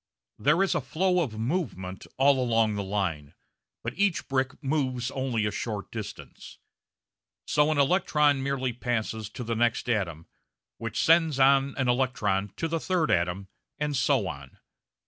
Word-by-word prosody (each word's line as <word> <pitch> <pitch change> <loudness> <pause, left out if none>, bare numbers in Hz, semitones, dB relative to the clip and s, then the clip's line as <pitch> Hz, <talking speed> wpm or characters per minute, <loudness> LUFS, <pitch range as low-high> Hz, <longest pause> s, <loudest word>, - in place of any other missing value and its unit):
There 155 +7 +3
is 195 - +1
a - - 0
flow 180 +7 +1
of 115 -9 -3
movement 110 - -3
all 135 -1 +4
along 115 -3 +2
the 100 - -2
line, 95 -8 -3 0.5
but - - -4
each 200 -2 +1
brick 135 0 0
moves 130 -3 -1
only 130 -5 -1
a 105 - 0
short 105 -1 -4
distance. 110 -3 -8 0.9
So 150 0 +2
an 155 - +1
electron 145 -2 +3
merely 130 -2 -1
passes 110 -3 -3
to 125 - -7
the 115 0 -2
next 120 +1 +1
atom, 90 -9 -1 0.5
which 115 -2 -4
sends 160 -3 +4
on 135 +1 +4
an 130 -2 0
electron 110 -6 +1
to 165 0 -2
a - - 0
third 175 - 0
atom, 90 +1 0 0.3
and 150 -1 -1
so 130 -7 +2
on. 70 -4 -8
125 Hz, 155 wpm, -27 LUFS, 105-145 Hz, 0.9 s, all